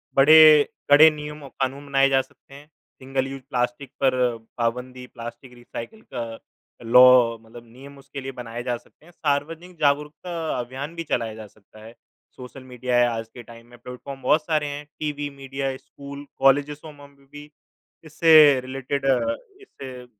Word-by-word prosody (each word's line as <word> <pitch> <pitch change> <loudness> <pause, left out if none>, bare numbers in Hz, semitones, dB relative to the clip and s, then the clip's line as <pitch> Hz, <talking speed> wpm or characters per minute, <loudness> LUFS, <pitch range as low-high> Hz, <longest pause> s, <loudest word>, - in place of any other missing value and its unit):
बड़े 155 +1 +8 0.3
कड़े 155 +2 +9
नियम 150 0 -8
और 135 - -10
कानून 135 +2 -2
बनाए 135 0 +3
जा 135 0 +3
सकते 135 +1 -20
हैं, 145 +2 -14 0.3
सिंगल 135 0 -2
यूज़ 135 0 -8
प्लास्टिक 125 +1 -3
पर 125 -3 +1 0.2
पाबंदी, 125 +2 -3
प्लास्टिक 120 +2 -10
रीसाइकल 120 - -10
का 115 -2 -4 0.6
लॉ 125 -1 +6
मतलब 115 +1 -14
नियम 140 +3 -14
उसके 135 0 -9
लिए 135 0 -6
बनाए 120 -2 -7
जा 120 -1 -2
सकते 150 - -25
हैं। 175 - -17
सार्वजनिक 165 +4 -3
जागरूकता 150 +2 -1
अभियान 135 +6 -6
भी 170 - -4
चलाया 115 -7 -2
जा 110 -1 -10
सकता 110 +1 -19
है, 115 - -12 0.4
सोशल 130 +1 -11
मीडिया 125 -1 -2
है 120 0 +4
आज 115 -1 -4
के 120 - -11
टाइम 115 +1 -15
में, 120 0 -16
प्लेटफॉर्म 125 +3 -10
बहुत 150 +4 +2
सारे 155 -2 0
हैं, 145 +1 -6
टीवी 145 -1 -3
मीडिया, 135 -1 -5
स्कूल, 140 +1 -11
कॉलेजेसो 145 +3 +1
मम 145 -1 -15
में 140 - -25
भी 145 0 -11 0.6
इससे 155 -3 +6
रिलेटेड 135 +2 -4
अ, 135 - +1 0.3
इससे 130 - -11
135 Hz, 165 wpm, -23 LUFS, 125-145 Hz, 0.6 s, कड़े